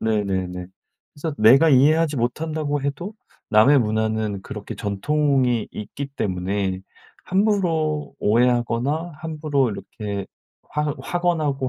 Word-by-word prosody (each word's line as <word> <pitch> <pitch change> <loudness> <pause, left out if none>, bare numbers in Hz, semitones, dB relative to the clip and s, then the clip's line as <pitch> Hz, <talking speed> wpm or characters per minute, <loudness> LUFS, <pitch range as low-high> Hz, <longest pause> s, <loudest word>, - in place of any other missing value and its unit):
네네네. 95 -5 -1 0.5
그래서 150 0 -4
내가 130 +9 +7
이해하지 150 +3 +4
못한다고 145 +4 -1
해도 145 +9 -4 0.4
남의 130 +7 +6
문화는 110 -2 -1
그렇게 105 -1 -7
전통이 125 +2 +1
있기 135 +6 -6
때문에 95 -5 -2 0.4
함부로 175 -7 0
오해하거나 125 +8 +1
함부로 150 -5 -1
이렇게 100 0 -5 0.4
확 150 -1 -2
확언하고 155 -4 0
135 Hz, 270 characters per minute, -22 LUFS, 105-155 Hz, 0.5 s, 내가